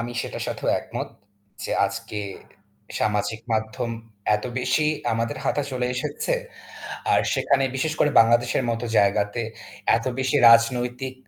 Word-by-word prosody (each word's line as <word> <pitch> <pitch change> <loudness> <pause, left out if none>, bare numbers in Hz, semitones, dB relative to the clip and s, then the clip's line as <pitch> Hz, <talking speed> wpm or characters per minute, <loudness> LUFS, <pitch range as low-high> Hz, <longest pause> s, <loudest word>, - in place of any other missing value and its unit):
আমি 120 +1 -4
সেটার - - -5
সাথেও - - -3
একমত - - -5 0.6
যে - - -4 0.2
আজকে 105 - -6 0.8
সামাজিক 110 +1 0
মাধ্যম 110 +2 -2 0.5
এত 105 - -8
বেশি 150 +4 +1 0.3
আমাদের 115 +5 -1
হাতে 145 - +1
চলে 125 -1 -1
এসেছে। 150 - -2 0.8
আর - - +5
সেখানে 135 -1 +2
বিশেষ 155 +4 0
করে 150 - +3
বাংলাদেশের 120 +3 +3
মতো 115 +1 -2
জায়গাতে 100 +3 +2 0.5
এত 115 - -4
বেশি 130 -1 +1
রাজনৈতিক 125 +2 +3
120 Hz, 130 wpm, -24 LUFS, 115-130 Hz, 0.8 s, আর